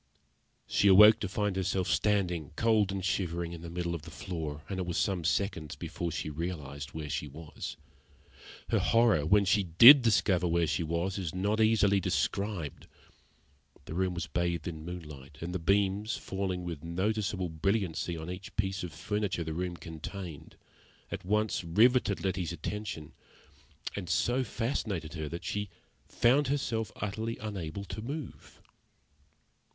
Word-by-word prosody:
She 100 - +2
awoke 105 +3 +9
to 100 - -3
find 105 0 -1
herself 95 -1 0
standing, 90 -8 0
cold 110 -3 +3
and 95 -2 -3
shivering, 85 -3 -1
in 85 - -8
the 85 - -7
middle 85 0 -2
of 85 - -4
the 80 - -11
floor, 80 -3 -5
and 95 -2 -4
it 90 - -1
was 85 - -2
some 95 -4 0
seconds 80 0 -1
before 85 -1 -4
she - - -3
realised 75 -4 -5
where 80 -2 -4
she 75 - -3
was. 75 +1 -8 0.9
Her - - +3
horror, 115 -11 +3
when 100 +2 +5
she 100 +2 +3
did 115 - +9
discover 100 -6 +3
where 85 0 +2
she 80 - -1
was, 85 +4 -1
is 90 -3 -4
not 105 +4 +1
easily 105 -3 +4
described. 100 -4 -2 1.0
The - - -7
room 90 +1 0
was 85 -2 -2
bathed 85 0 -1
in 80 -3 -6
moonlight, 75 -6 -9
and 85 +1 -5
the 90 - -1
beams, 100 +4 +1
falling 95 -2 -3
with 85 -4 -6
noticeable 95 +1 -1
brilliancy 85 0 -1
on 80 0 -6
each 90 +1 -7
piece 95 -2 -1
of 90 - -5
furniture 100 +1 -2
the 80 0 -4
room 90 +1 -3
contained, 80 -1 -8 0.6
at - - -5
once 105 +1 0
riveted 105 +3 +3
Letty's 90 -2 -1
attention, 85 -1 -5 0.8
and 90 -4 -5
so 125 +7 +2
fascinated 110 - -3
her 80 -3 -4
that 85 +2 -6
she 105 -1 -2 0.4
found 135 +4 +3
herself 115 -7 -1
utterly 110 +3 -3
unable 100 -3 -5
to 110 - -6
move. 140 +4 -7
90 Hz, 155 wpm, -30 LUFS, 85-105 Hz, 1.0 s, awoke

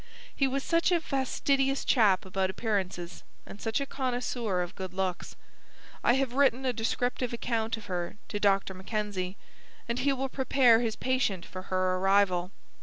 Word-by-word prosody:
He 275 - +2
was 270 +1 -1
such 335 +2 +2
a 345 - +4
fastidious 270 -1 0
chap 205 -8 +4
about 190 0 -1
appearances, 190 -4 -3 0.2
and 200 - -11
such 225 +1 0
a 280 - -2
connoisseur 245 -8 -1
of 175 - -7
good 185 -1 -7
looks. 190 -2 -2 0.7
I 240 - +5
have 265 -1 0
written 265 -1 +3
a 255 - +1
descriptive 245 +2 -1
account 230 -1 -1
of 215 - -10
her 180 0 -4
to 205 - -3
Dr. 195 -1 +2
Mackenzie, 195 -1 -3 0.5
and 235 +1 -1
he 280 +2 +2
will 270 0 -1
prepare 260 -3 +4
his 230 -2 -1
patient 250 -9 0
for 185 - -8
her 185 0 +1
arrival. 190 -2 +3
225 Hz, 165 wpm, -29 LUFS, 190-260 Hz, 0.7 s, I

